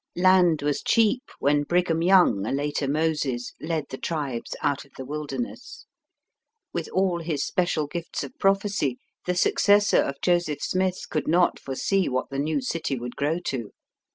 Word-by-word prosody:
Land 180 Hz, -4 st, +4 dB
was 145 Hz, -1 st, 0 dB
cheap 230 Hz, +2 st, +3 dB, 0.2 s
when 145 Hz, +1 st, +2 dB
Brigham 170 Hz, +1 st, +1 dB
Young, 180 Hz, -, +5 dB
a -, -, -1 dB
later 145 Hz, 0 st, -1 dB
Moses, 150 Hz, -4 st, -1 dB
led 155 Hz, -2 st, -2 dB
the 130 Hz, -, -6 dB
tribes 140 Hz, -8 st, -3 dB
out 140 Hz, -1 st, 0 dB
of 140 Hz, -, -23 dB
the 130 Hz, -, -6 dB
wilderness. 150 Hz, -, -6 dB, 0.9 s
With 170 Hz, -, -3 dB
all 185 Hz, -2 st, +1 dB
his 155 Hz, -4 st, -2 dB
special 175 Hz, -4 st, 0 dB
gifts 170 Hz, +3 st, -5 dB
of -, -, -9 dB
prophecy, 195 Hz, -9 st, +1 dB, 0.3 s
the 180 Hz, -, +1 dB
successor 205 Hz, +3 st, +4 dB
of 140 Hz, 0 st, -3 dB
Joseph 175 Hz, -4 st, +1 dB
Smith 185 Hz, 0 st, 0 dB
could 155 Hz, -, -1 dB
not 175 Hz, +3 st, +3 dB
foresee 185 Hz, +8 st, 0 dB
what 130 Hz, +2 st, -2 dB
the 135 Hz, -, -3 dB
new 155 Hz, -, 0 dB
city 165 Hz, -, -2 dB
would 120 Hz, 0 st, -6 dB
grow 150 Hz, +4 st, 0 dB
to. 120 Hz, -10 st, -4 dB
160 Hz, 160 wpm, -25 LUFS, 140-180 Hz, 0.9 s, Young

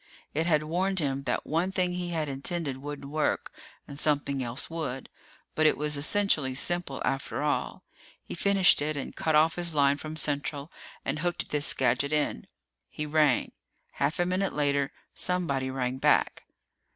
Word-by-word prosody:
It 160 Hz, +3 st, 0 dB
had 155 Hz, -3 st, +3 dB
warned 185 Hz, +5 st, 0 dB
him 140 Hz, -4 st, -1 dB
that -, -, -1 dB
one 170 Hz, +5 st, 0 dB
thing 180 Hz, -1 st, 0 dB
he 180 Hz, -1 st, -3 dB
had 160 Hz, -3 st, -1 dB
intended 140 Hz, +1 st, -2 dB
wouldn't 140 Hz, 0 st, -7 dB
work 155 Hz, 0 st, 0 dB, 0.4 s
and 140 Hz, -, -8 dB
something 145 Hz, -3 st, +1 dB
else 120 Hz, +3 st, -3 dB
would. 140 Hz, -6 st, -4 dB, 0.4 s
But 155 Hz, 0 st, +4 dB
it -, -, +3 dB
was 150 Hz, 0 st, +2 dB
essentially 145 Hz, -4 st, +2 dB
simple, 175 Hz, -1 st, -2 dB
after 135 Hz, +1 st, -2 dB
all. 150 Hz, -, -1 dB, 0.4 s
He -, -, -8 dB
finished 195 Hz, -3 st, +4 dB
it 150 Hz, 0 st, -1 dB
and 135 Hz, -, -5 dB
cut 160 Hz, -1 st, +1 dB
off 160 Hz, +3 st, +4 dB
his 170 Hz, -2 st, +1 dB
line 140 Hz, -1 st, +4 dB
from 155 Hz, +1 st, -6 dB
Central 145 Hz, 0 st, -1 dB, 0.3 s
and 140 Hz, +2 st, -1 dB
hooked 175 Hz, +1 st, -1 dB
this 150 Hz, 0 st, +1 dB
gadget 140 Hz, +1 st, +1 dB
in. 150 Hz, -, -1 dB, 0.4 s
He 150 Hz, -, -4 dB
rang. 150 Hz, -4 st, +2 dB, 0.4 s
Half 150 Hz, -, -1 dB
a 175 Hz, -, +3 dB
minute 185 Hz, +2 st, 0 dB
later, 140 Hz, -2 st, +1 dB, 0.2 s
somebody 140 Hz, -8 st, 0 dB
rang 130 Hz, 0 st, -2 dB
back. -, -, +2 dB
150 Hz, 165 wpm, -28 LUFS, 140-170 Hz, 0.4 s, But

